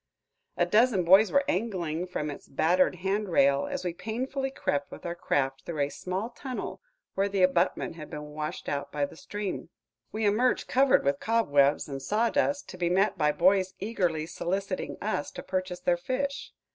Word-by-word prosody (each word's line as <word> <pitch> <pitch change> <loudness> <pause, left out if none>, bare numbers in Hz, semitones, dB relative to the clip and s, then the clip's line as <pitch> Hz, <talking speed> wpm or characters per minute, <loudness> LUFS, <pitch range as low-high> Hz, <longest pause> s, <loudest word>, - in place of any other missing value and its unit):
A - - +3
dozen 220 -3 +3
boys 195 +5 +6
were 280 0 +4
angling 180 - -1
from 150 -4 -3
its 145 - -10
battered 175 +6 +2
hand 200 +1 0
rail, 140 -4 +3
as - - -4
we 175 - -1
painfully 260 +8 -3
crept 145 - -2
with - - -11
our 170 - -2
craft 135 -6 -1
through 155 -1 -4
a 140 - +1
small 190 +9 -4
tunnel 260 -2 -6 0.3
where 195 +1 +1
the 195 -2 +1
abutment 180 -2 +1
had 155 -2 -8
been 150 -2 -7
washed 150 0 -5
out 140 0 -3
by 145 -1 0
the - - -11
stream. 205 +3 -5 0.4
We 215 0 -1
emerged 230 +5 +2
covered 265 - +4
with 140 0 +1
cobwebs 145 -11 +2
and 135 -2 -5
sawdust, 235 - +1
to 185 - -9
be 175 -1 +1
met 195 +4 +2
by 150 -3 +2
boys 185 +3 +3
eagerly 180 -7 -1
soliciting 185 +3 -3
us 205 -8 -1
to - - -7
purchase 185 -1 -3
their 175 -1 +2
fish. 275 +8 -3
185 Hz, 180 wpm, -28 LUFS, 155-215 Hz, 0.4 s, boys